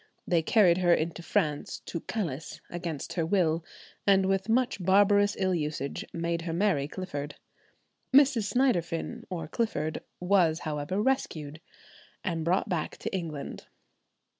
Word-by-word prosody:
They 170 Hz, -2 st, +2 dB
carried 180 Hz, 0 st, +4 dB
her 175 Hz, -2 st, +5 dB
into 165 Hz, +2 st, -3 dB
France 150 Hz, -3 st, -1 dB
to 170 Hz, -, -4 dB
"Calice" 160 Hz, -7 st, -4 dB
against 170 Hz, -4 st, -4 dB
her 170 Hz, -, 0 dB
will, 165 Hz, -2 st, +1 dB, 0.4 s
and 195 Hz, -1 st, +5 dB
with 195 Hz, +2 st, 0 dB
much 240 Hz, -4 st, +1 dB
barbarous 205 Hz, +2 st, +4 dB
ill 190 Hz, -1 st, +1 dB
usage 150 Hz, -4 st, -2 dB
made 170 Hz, 0 st, -2 dB
her 165 Hz, -1 st, -3 dB
marry 175 Hz, -6 st, +1 dB
Clifford. 145 Hz, -5 st, -5 dB, 0.8 s
Mrs. 260 Hz, -6 st, +5 dB
Synderfin 235 Hz, -2 st, 0 dB
or 170 Hz, -5 st, -4 dB
Clifford 160 Hz, -6 st, -2 dB, 0.2 s
was, 180 Hz, -3 st, +3 dB
however, 150 Hz, +4 st, -2 dB
rescued, 160 Hz, -, -1 dB, 0.6 s
and 165 Hz, -4 st, -1 dB
brought 180 Hz, +7 st, +1 dB
back 175 Hz, -6 st, -2 dB
to -, -, -4 dB
England. 160 Hz, -6 st, -5 dB
175 Hz, 135 wpm, -29 LUFS, 160-200 Hz, 0.8 s, her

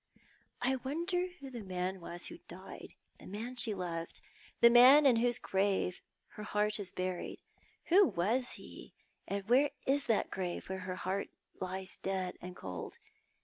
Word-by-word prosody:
I 265 Hz, +1 st, +2 dB
wonder 340 Hz, +8 st, -1 dB
who 275 Hz, -1 st, -9 dB
the 235 Hz, -4 st, -6 dB
man 185 Hz, 0 st, -3 dB
was 175 Hz, +1 st, -3 dB
who 335 Hz, -, -7 dB
died -, -, -10 dB
— -, -, -40 dB
the -, -, -12 dB
man 225 Hz, +6 st, -5 dB
she 225 Hz, -4 st, +2 dB
loved 170 Hz, -3 st, -4 dB, 0.2 s
— -, -, -25 dB
the 235 Hz, -, +8 dB
man 260 Hz, +5 st, +9 dB
in 250 Hz, -4 st, +6 dB
whose 240 Hz, 0 st, +3 dB
grave 190 Hz, -2 st, 0 dB, 0.3 s
her 210 Hz, -, -10 dB
heart 210 Hz, 0 st, 0 dB
is 190 Hz, -2 st, -3 dB
buried? 185 Hz, -1 st, -4 dB, 0.5 s
Who 380 Hz, +2 st, +7 dB
was 230 Hz, +9 st, 0 dB
he, -, -, -10 dB, 0.3 s
and 200 Hz, 0 st, -3 dB
where 265 Hz, +5 st, +5 dB, 0.2 s
is 280 Hz, +1 st, +3 dB
that 225 Hz, -, +1 dB
grave 180 Hz, -2 st, -4 dB
where 190 Hz, 0 st, -3 dB
her 185 Hz, -, -2 dB
heart 190 Hz, +2 st, -3 dB, 0.3 s
lies 185 Hz, 0 st, -4 dB
dead 190 Hz, -1 st, -2 dB
and 180 Hz, 0 st, -8 dB
cold? 90 Hz, -, -7 dB
205 Hz, 170 wpm, -33 LUFS, 185-250 Hz, 0.5 s, man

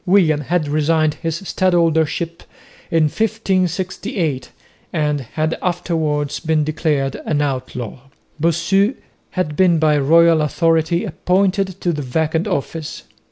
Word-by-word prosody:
William 170 Hz, -6 st, +4 dB
had 160 Hz, +1 st, -1 dB
resigned 155 Hz, +1 st, +2 dB
his 165 Hz, +2 st, -3 dB
stadholdership 170 Hz, -3 st, +1 dB, 0.5 s
in 165 Hz, -1 st, +3 dB
1568 185 Hz, -, -1 dB, 0.4 s
and 150 Hz, -3 st, 0 dB
had 155 Hz, +6 st, -2 dB
afterwards 160 Hz, -5 st, -1 dB
been 160 Hz, -2 st, +1 dB
declared 150 Hz, -3 st, -1 dB
an 150 Hz, -2 st, +1 dB
outlaw. 130 Hz, -5 st, -3 dB, 0.4 s
Bossu 175 Hz, -, +2 dB, 0.4 s
had 150 Hz, -5 st, -1 dB
been 180 Hz, -1 st, +4 dB
by 155 Hz, -2 st, +3 dB
royal 165 Hz, +3 st, +5 dB
authority 165 Hz, +2 st, +1 dB
appointed 190 Hz, 0 st, 0 dB
to 175 Hz, -, 0 dB
the 150 Hz, -, -3 dB
vacant 160 Hz, +5 st, -1 dB
office. 155 Hz, +2 st, -4 dB
160 Hz, 115 wpm, -19 LUFS, 150-180 Hz, 0.5 s, royal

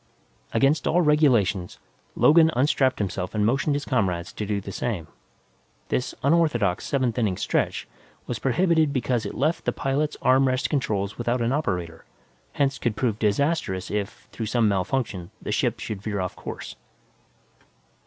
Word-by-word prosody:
Against 145 Hz, +2 st, +2 dB
all 175 Hz, +2 st, +3 dB
regulations, 120 Hz, -, +2 dB, 0.4 s
Logan 160 Hz, +1 st, +6 dB
unstrapped 135 Hz, 0 st, +2 dB
himself 95 Hz, -1 st, -3 dB
and 105 Hz, -1 st, +2 dB
motioned 140 Hz, +5 st, +1 dB
his 145 Hz, -, -3 dB
comrades 90 Hz, -9 st, -1 dB
to 105 Hz, -, -4 dB
do 105 Hz, -1 st, 0 dB
the 100 Hz, 0 st, -7 dB
same. 95 Hz, -5 st, -3 dB, 0.8 s
This 125 Hz, -, -1 dB
unorthodox 140 Hz, -, +2 dB
seventh 130 Hz, -4 st, 0 dB
inning 100 Hz, -6 st, 0 dB
stretch -, -, -1 dB, 0.4 s
was 120 Hz, -4 st, -4 dB
prohibited 160 Hz, -, +2 dB
because 125 Hz, -3 st, 0 dB
it -, -, -7 dB
left 155 Hz, +6 st, 0 dB
the -, -, +2 dB
pilot's 145 Hz, +2 st, -1 dB
arm 130 Hz, +1 st, +4 dB
rest 130 Hz, +2 st, 0 dB
controls 105 Hz, -8 st, -1 dB
without 120 Hz, +1 st, 0 dB
an 115 Hz, -, +1 dB
operator, 90 Hz, -, -2 dB, 0.5 s
hence 140 Hz, -1 st, 0 dB
could 120 Hz, -3 st, -1 dB
prove 110 Hz, -2 st, -1 dB
disastrous 105 Hz, -, 0 dB
if, 105 Hz, -1 st, -4 dB
through 110 Hz, -, -4 dB
some 115 Hz, 0 st, +2 dB
malfunction, 100 Hz, -2 st, -1 dB
the -, -, -5 dB
ship -, -, 0 dB
should 105 Hz, -3 st, -5 dB
veer 105 Hz, -1 st, -3 dB
off 90 Hz, -1 st, -3 dB
course. -, -, -7 dB
120 Hz, 155 wpm, -25 LUFS, 100-140 Hz, 0.8 s, Logan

